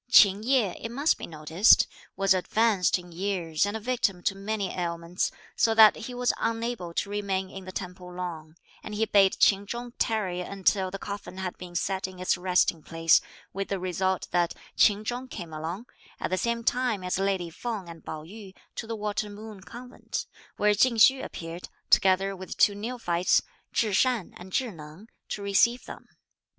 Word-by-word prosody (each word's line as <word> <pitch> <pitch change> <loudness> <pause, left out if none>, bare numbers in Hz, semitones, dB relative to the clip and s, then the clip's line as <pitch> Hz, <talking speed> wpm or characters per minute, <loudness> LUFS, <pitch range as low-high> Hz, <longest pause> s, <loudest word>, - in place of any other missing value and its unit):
Ch'in 200 -4 +7
Yeh, 230 -5 +2
it 230 - -4
must 280 +7 +1
be - - -6
noticed, 160 +6 +4 0.3
was 195 0 +3
advanced 195 0 +2
in 175 -1 -12
years 175 -2 -1
and 205 +2 -2
a - - -7
victim 215 -6 -1
to - - +1
many 200 0 -3
ailments, 170 0 -2 0.3
so 225 -1 +3
that 220 -1 +8
he 245 +2 -7
was 245 0 +1
unable 230 -5 -2
to 200 - -1
remain 195 -2 -2
in 190 -1 -9
the 185 - -7
temple 180 -1 -7
long, 165 -3 -6 0.3
and 210 - -7
he 220 +2 +1
bade 195 -3 +4
Ch'in 200 0 +4
Chung 240 +2 -5
tarry 190 -6 0
until 190 0 0
the 195 - -5
coffin 200 -2 -7
had 190 -1 -4
been 175 -1 -9
set 190 +1 -1
in 185 -1 -11
its 185 0 +1
resting 180 -2 +1
place, 165 +1 +3 0.3
with 195 0 -3
the 195 - -2
result 185 +1 -1
that 175 -1 +1 0.2
Ch'in 210 +1 +4
Chung 245 +3 -3
came 175 -10 -8
along, 165 +8 -5 0.3
at - - -3
the - - +3
same 235 +3 -1
time 245 -5 0
as 180 +1 -1
lady 190 -3 0
Feng 215 0 -5
and 165 -1 -11
Pao 155 -1 -6
yü, 195 +2 -11 0.2
to 225 - -6
the 225 - -3
Water 210 0 -2
Moon 210 -1 -10
Convent, 245 +5 -7 0.3
where 210 0 +4
Ch'ing 235 +4 +3
Hsü 260 +4 +6
appeared, 165 +1 -7 0.2
together 195 +1 +4
with 190 0 -8
two 205 - +5
neophytes, 200 -5 0 0.3
Chih 215 -3 +1
Shan 245 -2 +1
and 185 +1 -11
Chih 250 +2 0
Neng, 160 +7 -12 0.2
to 205 - -4
receive 225 +5 +3
them. - - -10
195 Hz, 185 wpm, -27 LUFS, 180-220 Hz, 0.3 s, that